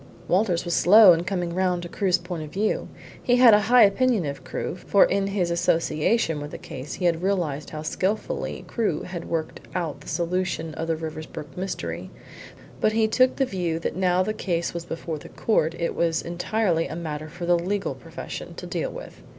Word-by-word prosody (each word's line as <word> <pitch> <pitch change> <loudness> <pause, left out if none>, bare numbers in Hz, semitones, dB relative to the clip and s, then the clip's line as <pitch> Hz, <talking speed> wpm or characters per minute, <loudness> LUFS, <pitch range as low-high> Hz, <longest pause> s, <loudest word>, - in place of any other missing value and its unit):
Walters 180 -2 +2
was 175 - -1
slow 200 +1 +8
in 170 +1 -1
coming 180 -3 -2
round 180 -1 0
to - - -5
Crewe's 185 0 +1
point 175 -2 -6
of 155 - -7
view. 210 +6 -1 0.3
He 245 - +3
had 245 -3 +8
a 210 - +7
high 245 -1 +8
opinion 210 -1 +3
of 140 -1 -5
Crewe, - - -4
for 195 +2 +4
in 195 0 0
his 190 -4 0
association 165 0 +1
with 145 - -6
the - - -7
case 130 +2 -7
he 180 - -3
had 170 -1 +2
realised 175 -7 -1
how 155 0 -6
skilfully 200 - -2
Crewe 210 -10 -1
had 175 -2 -6
worked 160 -1 -3 0.2
out 160 -5 -3
the - - -14
solution 170 -1 -2
of 165 +1 -4
the 165 - +1
Riversbrook 155 -1 -7
mystery. 190 +1 -4 0.7
But 215 - +2
he 220 0 +3
took 255 +3 +3
the 270 - +2
view 175 -7 -2
that 165 - -3
now 185 0 +2
the 215 - -2
case 170 -5 -2
was 170 -1 -5
before 165 -2 -5
the - - -12
court 165 -8 +1
it 170 - -1
was 165 -1 0
entirely 175 0 0
a - - -6
matter 155 -2 -5
for 175 +2 -6
the 175 0 +3
legal 195 +3 -2
profession - - -8
to - - -7
deal - - -2
with. - - -10
175 Hz, 200 wpm, -25 LUFS, 165-200 Hz, 0.7 s, slow